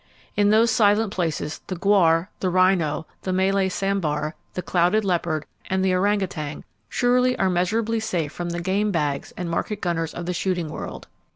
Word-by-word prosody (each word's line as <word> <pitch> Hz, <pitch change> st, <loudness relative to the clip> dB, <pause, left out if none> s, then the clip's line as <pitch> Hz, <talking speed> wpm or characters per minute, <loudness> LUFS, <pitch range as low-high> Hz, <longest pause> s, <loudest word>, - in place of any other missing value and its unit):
In 205 Hz, 0 st, +3 dB
those 220 Hz, +2 st, +4 dB
silent 215 Hz, -1 st, +3 dB
places 160 Hz, -4 st, -2 dB
the 185 Hz, -, -3 dB
gaur, 175 Hz, -2 st, +3 dB
the 185 Hz, -, 0 dB
rhino, 180 Hz, -4 st, +2 dB, 0.2 s
the 185 Hz, -, -3 dB
Malay 190 Hz, +1 st, +2 dB
sambar, 180 Hz, -6 st, -1 dB, 0.2 s
the 180 Hz, -, -3 dB
clouded 180 Hz, +4 st, +2 dB
leopard 170 Hz, -4 st, 0 dB, 0.2 s
and 190 Hz, 0 st, +1 dB
the 185 Hz, -, +2 dB
orang 200 Hz, +3 st, +2 dB
utan 155 Hz, -5 st, -4 dB, 0.3 s
surely 250 Hz, +1 st, +2 dB
are 190 Hz, -1 st, +2 dB
measurably 220 Hz, +6 st, 0 dB
safe 175 Hz, -9 st, -2 dB
from 175 Hz, +1 st, -4 dB
the 170 Hz, 0 st, -3 dB
game 200 Hz, +4 st, +1 dB
bags 145 Hz, -5 st, -1 dB
and 180 Hz, -, -3 dB
market 195 Hz, +5 st, -2 dB
gunners 165 Hz, -3 st, -2 dB
of 175 Hz, -, -5 dB
the 180 Hz, -, -2 dB
shooting 175 Hz, -2 st, -1 dB
world. 155 Hz, -, -7 dB
185 Hz, 175 wpm, -23 LUFS, 170-205 Hz, 0.3 s, those